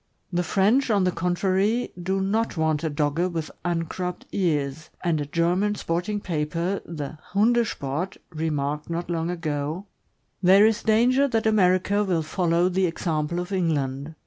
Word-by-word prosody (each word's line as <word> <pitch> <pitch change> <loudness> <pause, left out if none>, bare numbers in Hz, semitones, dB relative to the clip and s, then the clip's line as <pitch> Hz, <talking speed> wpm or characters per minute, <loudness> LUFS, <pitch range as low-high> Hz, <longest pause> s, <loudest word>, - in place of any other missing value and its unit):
The 175 - +2
French, 210 +9 +2
on 205 -3 +3
the 180 - +2
contrary, 190 +6 0
do 190 +2 0
not 215 +1 0
want 160 -1 +1
a 160 - 0
Dogge 150 +4 0
with 165 -2 -4
uncropped 175 +1 -3
ears; 155 -5 -1
and 165 -4 +1
a 145 - -4
German 180 +7 +1
sporting 180 +4 -2
paper, 170 +2 -2
the 155 -2 -6 0.2
Hunde 235 +4 +4
Sport, 150 +7 -3
remarked 150 -2 -2
not 170 +1 -3
long 165 0 -1
ago: 160 +1 -3 0.6
There 195 +3 +7
is 220 0 +2
danger 245 +5 +3
that 225 -4 0
America 200 -1 +3
will 175 -5 0
follow 170 +2 +1
the 185 0 +1
example 165 0 -2
of 180 +2 -5
England. 150 -5 -1
175 Hz, 150 wpm, -25 LUFS, 160-195 Hz, 0.6 s, There